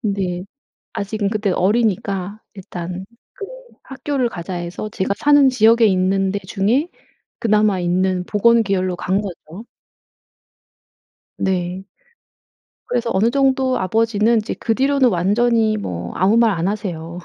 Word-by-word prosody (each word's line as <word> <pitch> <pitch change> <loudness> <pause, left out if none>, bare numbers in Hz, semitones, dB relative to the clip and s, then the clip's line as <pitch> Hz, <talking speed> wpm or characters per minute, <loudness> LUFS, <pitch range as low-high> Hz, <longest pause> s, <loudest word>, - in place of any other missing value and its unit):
근데 195 -5 -2 0.5
아직은 200 0 -2
그때 210 -2 -1
어리니까 200 -1 0 0.2
'일단 180 0 -7 0.3
그 400 - -7 0.4
학교를 270 -2 -2
가자.' 180 -1 -7
해서 175 +4 -5
제가 195 -1 -1
사는 290 -2 +5
지역에 230 -1 +4
있는 190 0 +2
데 200 - -2
중에 225 - +1 0.5
그나마 210 -4 +2
있는 180 +1 0
보건 230 +2 +3
계열로 185 -3 -1
간 195 +4 -1
거죠. 185 +1 -9 1.7
네. 185 0 -2 1.0
그래서 240 -1 -2
어느 215 +5 +2
정도 265 -1 +1
아버지는 225 +3 +2
이제 215 - -3
그 225 - 0
뒤로는 270 0 +3
완전히 215 +4 +2
뭐 85 - -5
아무 195 +5 +2
말 230 -1 +4
안 175 +1 -1
하세요. 175 -5 -5
200 Hz, 260 characters per minute, -19 LUFS, 185-230 Hz, 1.7 s, 사는